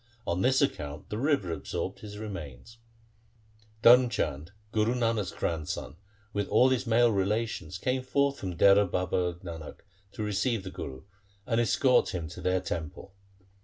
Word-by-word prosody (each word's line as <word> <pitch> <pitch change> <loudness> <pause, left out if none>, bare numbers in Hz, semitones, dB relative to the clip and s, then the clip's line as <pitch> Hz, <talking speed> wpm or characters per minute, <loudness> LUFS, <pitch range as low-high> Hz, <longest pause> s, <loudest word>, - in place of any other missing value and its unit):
On 85 +2 -1
this 130 +4 +3
account 75 - -3
the 105 - -2
river 135 - +1
absorbed 80 - -4
his 105 -1 -9
remains.' 95 - -8 1.0
Dharm 125 +1 +8
Chand, 75 - -3 0.2
Guru 110 +3 +1
Nanak's 115 -6 0
grandson, 80 -3 -3 0.4
with 100 -1 -1
all 130 - +5
his 130 -1 0
male 115 +1 +4
relations 100 -4 -1
came 130 +6 -1
forth 140 +2 0
from 90 -3 -5
Dehra 100 0 +6
Baba 90 -1 0
Nanak 80 -4 -8 0.3
to 110 - -4
receive 105 +1 0
the 95 - -7
Guru 65 -1 -7 0.4
and 115 0 +1
escort 125 -2 +3
him 85 -3 -3
to 85 - -9
their 90 0 +1
temple. 85 +3 -6
100 Hz, 150 wpm, -29 LUFS, 85-120 Hz, 1.0 s, Dharm